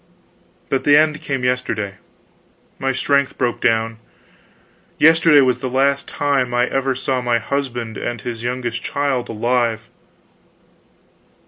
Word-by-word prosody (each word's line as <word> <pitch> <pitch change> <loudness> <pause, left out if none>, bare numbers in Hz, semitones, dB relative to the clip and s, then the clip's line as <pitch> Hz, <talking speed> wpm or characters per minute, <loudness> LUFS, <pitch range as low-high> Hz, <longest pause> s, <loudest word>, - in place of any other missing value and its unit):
But 135 - -1
the 145 0 +6
end 155 0 +2
came 135 -3 -3
yesterday; 115 -6 -2 0.8
my 135 0 0
strength 140 +1 0
broke 120 -2 -1
down. 115 0 +1 1.0
Yesterday 160 -1 +6
was 130 -2 +2
the 130 - -3
last 140 +2 +1
time 135 -4 0
I 120 0 +3
ever 135 0 -1
saw 130 0 -1
my 120 -1 +1
husband 120 -3 -3
and 120 -1 -4
this 115 0 -6
youngest 120 -1 -3
child 140 -4 -2
alive. 115 0 -1
125 Hz, 125 wpm, -19 LUFS, 120-140 Hz, 1.0 s, the